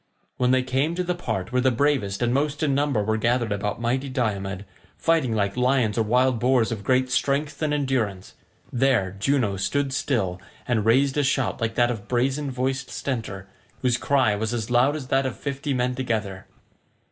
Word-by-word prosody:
When 125 -1 +2
they 130 0 +3
came 135 +6 0
to 180 - -1
the 180 0 -1
part 95 - -4
where 125 0 +2
the 130 - +4
bravest 125 -5 0
and 120 0 +1
most 145 +2 0
in 145 -3 +2
number 140 -6 +1
were 110 +1 0
gathered 120 0 +1
about 105 +1 -2
mighty 130 +4 -1
Diomed, 100 -6 -2 0.3
fighting 160 -9 +1
like 100 -2 0
lions 125 -4 +2
or 115 - +2
wild 125 +2 +2
boars 125 -1 +2
of 110 -3 -4
great 130 +3 +2
strength 145 +3 0
and 155 -1 0
endurance, 130 -10 -1 0.4
there 120 -7 +2
Juno 115 -4 +1
stood 135 +8 -1
still 95 -11 -1 0.3
and 110 -4 +1
raised 135 +5 +3
a 145 - +3
shout 130 -2 0
like 115 0 -1
that 120 0 +3
of 105 -4 -6
brazen 135 +4 0
voiced 130 +1 -2
Stentor, 110 -8 -4 0.4
whose 125 -2 +2
cry 130 -7 +2
was 110 +3 -2
as 115 0 -4
loud 125 +4 +4
as 135 -4 -6
that 135 0 +2
of 130 - -5
fifty 140 0 -4
men 125 -1 0
together. 110 -7 -3
125 Hz, 190 wpm, -24 LUFS, 110-135 Hz, 0.4 s, the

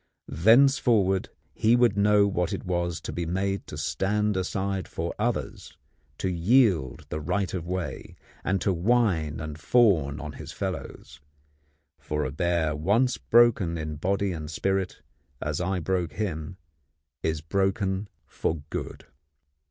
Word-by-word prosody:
Thenceforward 110 - +4 0.2
he 115 +2 +3
would 120 -4 +4
know 105 0 +4
what 90 -4 -1
it - - -4
was 85 -2 -1
to - - -6
be 85 -1 -3
made 95 +3 -2
to 75 - -7
stand 95 +9 0
aside 95 +1 -2
for - - -4
others, - - -3 0.4
to - - -2
yield 90 - +2
the 75 - -3
right 95 +5 -1
of 85 -3 -4
way, 90 -7 -4 0.3
and 95 +2 +1
to 95 - +1
whine 90 -6 +1
and 75 -1 -6
fawn 80 - +3
on 75 0 -6
his - - -9
fellows; 70 - -6 0.8
for 75 0 -2
a 65 - -3
bear 85 0 0
once 105 +11 +1
broken 115 -8 +4
in 80 -1 -4
body 100 +4 0
and 80 -3 -5
spirit, 95 +3 -2 0.4
as 75 +2 -2
I 95 +1 0
broke 90 -2 -1
him, 90 -1 -4 0.6
is 80 -1 -1
broken 95 +3 0 0.2
for 80 - -2 0.2
good. - - -5
95 Hz, 140 wpm, -26 LUFS, 80-100 Hz, 0.8 s, Thenceforward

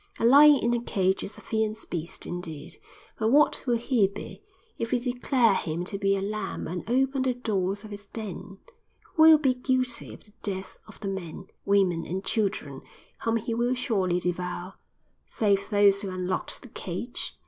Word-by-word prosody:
A - - 0
lion 290 +4 +8
in 240 -3 +1
a 240 - 0
cage 190 -4 0
is 210 - -5
a - - -11
fierce 220 0 -2
beast, 170 0 -5
indeed; 165 -4 -6 0.4
but 220 - +1
what 290 +6 +4
will 240 -1 +3
he 235 -4 +2
be 200 +2 -9 0.4
if 230 - -2
we 250 - +2
declare 245 -2 +2
him 165 -1 -2
to 195 +2 -4
be 195 -1 +2
a 195 - -3
lamb 215 +1 -4
and 175 +1 -4
open 265 +2 +2
the 260 -1 +1
doors 200 -4 -2
of 215 - -10
his 205 0 -9
den? 200 -3 -7 0.6
Who 315 - +1
will 320 0 +9
be 275 -4 +2
guilty 255 -1 -1
of - - -18
the 210 - -24
deaths 190 -2 -4
of - - -14
the 200 - -4
men, 190 -1 -6 0.2
women 190 -4 +2
and 190 +3 -3
children 195 -11 -1 0.4
whom 230 0 +2
he 230 +1 -3
will 240 +2 +1
surely 190 -8 0
devour, 180 +1 -3 0.5
save 200 -2 +1
those 205 -2 +4
who 200 - -3
unlocked 185 +5 -3
the 250 - -12
cage?" 195 +5 -5
205 Hz, 185 wpm, -27 LUFS, 190-240 Hz, 0.6 s, will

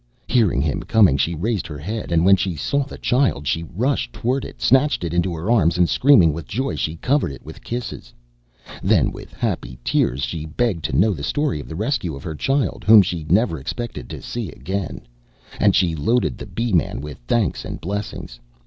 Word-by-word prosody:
Hearing 105 - +2
him 75 -3 -1
coming, 105 -11 +4
she 80 +5 0
raised 105 +4 -2
her 75 - -7
head, 105 +7 -5
and 85 0 +3
when 95 +1 +7
she 95 -2 -2
saw 140 - 0
the 140 - -10
child 125 - +1
she 80 - 0
rushed 120 - -1
towards 125 +3 -2
it, - - -14
snatched 135 -4 +3
it 85 -1 -3
into 85 +1 +1
her 85 +8 -2
arms, 85 -7 +3
and 90 -1 +4
screaming 100 - +5
with 80 -1 -7
joy 130 +5 -2
she 80 - -2
covered 135 - 0
it 70 - -11
with - - -11
kisses. 120 - -5 0.7
Then - - +3
with - - -10
happy - - -3
tears 65 +2 +1
she 80 +1 -3
begged 90 0 -1
to 80 - -1
know 105 +2 +4
the 75 - -7
story 140 - -1
of - - -9
the 80 - -6
rescue 105 - -1
of 70 - -10
her 80 - -4
child, 135 - -1
whom 105 -1 +8
she 85 -4 -4
never 95 - +2
expected 95 - -6
to - - -8
see 120 -6 -4
again; 95 0 -4 0.6
and - - +4
she 90 -3 +3
loaded 115 +12 +1
the - - -7
Bee 115 -2 -2
man 85 - +1
with 75 -1 -8
thanks 115 - 0
and - - -6
blessings. 100 -10 -5
90 Hz, 205 wpm, -21 LUFS, 80-120 Hz, 0.7 s, whom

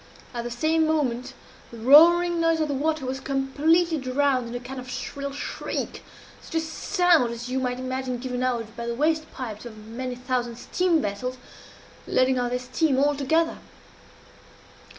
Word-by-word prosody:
At 235 -1 -3
the - - -3
same 315 +6 +1
moment 260 -6 -1 0.3
the 235 - -11
roaring 335 +8 +6
noise 330 -1 +2
of 310 - +1
the 290 - -2
water 310 +1 -1
was 260 +1 -3
completely 305 +5 +1
drowned 260 -1 +1
in 235 - -6
a - - -2
kind 255 +2 -7
of 255 0 -9
shrill 280 +2 -5
shriek 285 - -4 0.4
such - - -10
a - - +4
sound 325 - +2
as 235 +1 -6
you 260 +1 0
might 250 -1 -1
imagine 255 -1 -3
given 250 0 -4
out 235 -3 -2
by 235 0 -5
the 235 - -2
water 310 +4 +2
pipes 220 -5 -6
of 235 -3 -9
many 235 +4 -6
thousand 245 -1 -2
steam 330 +6 +1
vessels, 250 +6 -3 0.7
letting 255 0 +2
off 245 -1 0
their 250 - 0
steam 260 +3 0
all 290 +2 +3
together. 320 +4 +1
260 Hz, 170 wpm, -25 LUFS, 245-315 Hz, 0.7 s, roaring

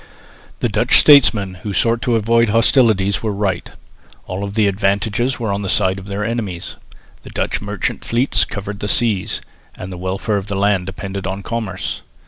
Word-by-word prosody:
The - - +2
Dutch - - +4
statesmen 110 -10 +5
who 105 0 -4
sought 115 +5 +2
to 125 -4 +1
avoid 115 +1 +2
hostilities 110 -4 +3
were 110 - -1
right. 100 -3 -2 0.6
All 95 +2 -4
the 105 +2 +1
advantages 100 +5 0
were 110 -4 -1
on 100 - -2
the 95 - -3
side 95 +1 +2
of 95 - -11
their 100 +1 -3
enemies. 105 -7 -4 0.5
The - - -12
Dutch - - -2
merchant 100 -2 -3
fleets 120 +4 +1
covered 100 0 -5
the 105 - -3
seas, 105 -2 +1 0.3
and 90 - -8
the 90 - -7
welfare 95 +3 -2
of 100 0 -5
the 100 - -3
land 100 -2 +1
depended 95 +1 -5
on 95 +1 -4
commerce. 100 -5 -4
100 Hz, 175 wpm, -18 LUFS, 95-115 Hz, 0.6 s, statesmen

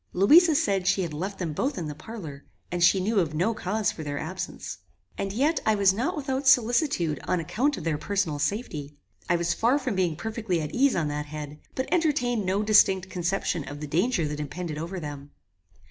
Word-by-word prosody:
Louisa 310 - +6
said 195 - +1
she 195 0 +3
had 165 -3 -4
left 190 +6 -4
them 170 -4 -3
both 265 - -1
in 170 -4 -3
the 150 - -4
parlour, 155 -4 -9 0.3
and 175 0 0
she 190 +2 +5
knew 205 +3 +1
of 155 -4 -1
no 185 +9 +1
cause 215 0 -1
for - - -8
their 145 -2 -4
absence. 160 +6 -5 0.4
As 195 - -3
yet 295 +7 +2
I 220 - +3
was 200 -2 +4
not 265 - -1
without 270 -1 -2
solicitude 240 - +3
on 180 - +1
account 255 - 0
of - - -6
their 155 -2 -1
personal 195 -7 -1
safety. 150 - -3 0.3
I 175 - +4
was 170 0 0
far 240 +5 +2
from 255 -5 -2
being 180 -4 0
perfectly 220 -3 -2
at 150 -2 -4
ease 275 +2 +3
on 165 -4 0
that 150 0 -3
head, 150 0 -7 0.2
but 260 - -1
entertained 250 - +1
no 195 +3 +1
distinct 190 -3 +4
conception 175 -2 -1
of 145 0 -7
the 150 - -5
danger 170 - +1
that 150 0 -4
impended 155 +1 -5
over 175 +4 -4
them. 145 -2 -7
190 Hz, 210 wpm, -26 LUFS, 155-230 Hz, 0.4 s, Louisa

